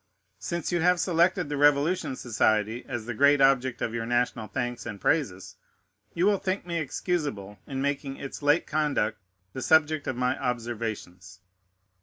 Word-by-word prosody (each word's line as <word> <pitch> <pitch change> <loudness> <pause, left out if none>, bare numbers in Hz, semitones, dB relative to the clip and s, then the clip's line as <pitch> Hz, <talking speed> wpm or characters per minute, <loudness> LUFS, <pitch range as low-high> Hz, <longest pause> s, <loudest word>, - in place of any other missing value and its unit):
Since 170 -1 -3
you 175 -1 +1
have 180 +1 +3
selected 175 0 +2
the 145 0 -3
Revolution 145 +1 +2
Society 110 -1 0
as 120 -4 -4
the 120 - -4
great 140 +4 +4
object 130 -2 +3
of 115 - -2
your 115 -1 -3
national 120 -2 0
thanks 120 +3 -3
and 105 -3 -6
praises, 100 - -1 0.6
you 175 +2 +2
will 205 -1 +3
think 185 0 -2
me 170 -1 -2
excusable 140 - -3
in 135 -1 -3
making 140 -1 -2
its 140 - -7
late 145 +3 +3
conduct 145 -8 0 0.3
the 130 - -5
subject 155 0 +3
of 130 - -1
my 125 +1 0
observations. 110 -7 -4
135 Hz, 160 wpm, -27 LUFS, 115-155 Hz, 0.6 s, great